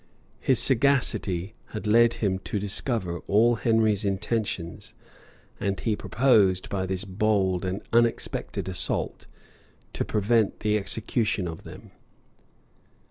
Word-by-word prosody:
His 130 - +2
sagacity 110 -8 +2 0.2
had 105 - -5
led 115 +2 +5
him 95 -3 -1
to 105 - -4
discover 100 -3 -2
all 115 +4 +4
Henry's 110 -2 +2
intentions; 100 -3 -3 0.6
and 100 -1 -2
he 110 -2 0
proposed, 105 -7 +2
by 95 -2 -2
this 95 +2 -2
bold 95 -2 0
and 95 +2 -3
unexpected 115 -4 0
assault, 95 -1 -3 0.7
to - - -2
prevent 110 0 +1
the 105 0 +1
execution 105 -1 -1
of 80 -1 -8
them. - - -12
105 Hz, 115 wpm, -26 LUFS, 95-115 Hz, 0.7 s, led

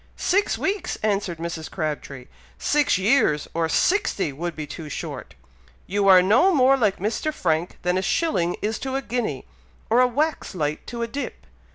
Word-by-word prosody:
"Six 400 +3 +1
weeks!" 395 -1 -2
answered 200 -5 0
Mrs. 165 -1 -5
Crabtree; 145 -5 -4 0.3
"six 295 -8 +2
years, 190 - +2
or 165 -1 0
sixty, 200 - +1
would 170 +3 -4
be 155 - -5
too 150 +1 -8
short. - - -6 0.5
You 200 +1 0
are 185 -2 +8
no 240 - +5
more 270 -4 +5
like 215 -7 +1
Mr. 220 - -1
Frank 165 - -1
than 180 +1 +1
a - - -1
shilling 190 - 0
is 215 +1 -1
to 265 0 -3
a 275 - -1
guinea, 245 0 -3 0.5
or 235 - +5
a 255 - +5
wax 290 -1 -1
light 150 -3 -2
to 235 -1 -4
a - - -2
dip. 280 +5 -6
200 Hz, 175 wpm, -23 LUFS, 165-270 Hz, 0.5 s, are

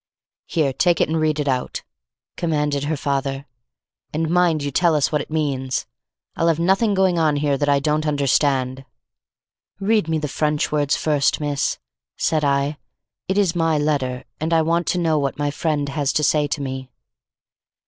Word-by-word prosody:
"Here 150 -6 0
take 175 +4 +2
it - - +2
and 160 0 0
read 155 -1 +1
it 145 - -1
out," 130 -2 -2 0.5
commanded 150 -4 -1
her 155 +1 -1
father; 140 0 -2 0.7
"and 160 +1 -1
mind 175 -4 +2
you 145 - -2
tell 170 +3 +3
us 145 - +1
what 150 -1 +1
it - - -9
means. 140 -4 -1 0.5
I'll 165 - +1
have 165 -2 +3
nothing 195 +5 +2
going 190 -2 +2
on 155 -2 +2
here 145 -1 +1
that 145 +1 0
I 140 -1 +4
don't 150 +2 0
understand." 135 -2 +1 1.0
"Read 210 -2 +1
me 160 -1 0
the 150 -1 -2
French 150 +1 -1
words 145 -2 +1
first, 150 -3 +1
miss," 145 -2 -1 0.4
said 155 -1 +1
I. 140 +1 0 0.5
"It 190 - 0
is 190 -4 +2
my 165 -2 +2
letter 140 -4 -1 0.2
and 160 +2 -1
I 165 -1 +4
want 170 +2 0
to - - +1
know 160 -3 +2
what 140 -1 -2
my 145 -1 -1
friend 145 -1 -1
has 140 -1 0
to 150 - +1
say 150 0 +2
to 145 0 -3
me." 130 -1 -5
150 Hz, 180 wpm, -21 LUFS, 140-160 Hz, 1.0 s, I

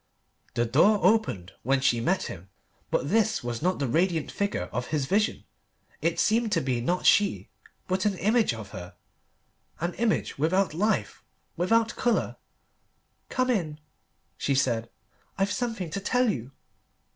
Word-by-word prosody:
The 120 - +2
door 170 - +4
opened 185 - +2
and 135 +2 +1
she 120 -4 +3
met 185 +11 +1
him, 95 +1 -8 0.4
but 140 - -1
this 220 - +2
was 120 -1 -4
not 180 +3 +1
the 140 - -1
radiant 165 +4 +1
figure 200 - -1
of 125 +3 -2
his 150 -4 -1
vision. 205 +8 0 0.6
It 170 0 0
seemed 225 0 +2
to 170 - +3
be 130 -5 -1
not 175 +9 -1
she, 205 -2 +3 0.4
but 185 +2 +1
an 195 -3 -1
image 220 - +2
of 110 -3 -7
her 90 -2 -9 0.8
an 170 +2 -2
image 225 -9 -1
without 180 +3 +2
life, 210 +7 -1 0.3
without 225 +6 +2
colour. 240 -2 0 0.9
"Come 255 -1 +1
in," 160 -9 -2 0.6
she 140 - +1
said; 120 -3 0 0.5
"I've 195 +1 +1
something 225 -9 -3
to 200 - -2
tell 250 +3 +2
you." 125 0 -6
175 Hz, 150 wpm, -27 LUFS, 130-210 Hz, 0.9 s, door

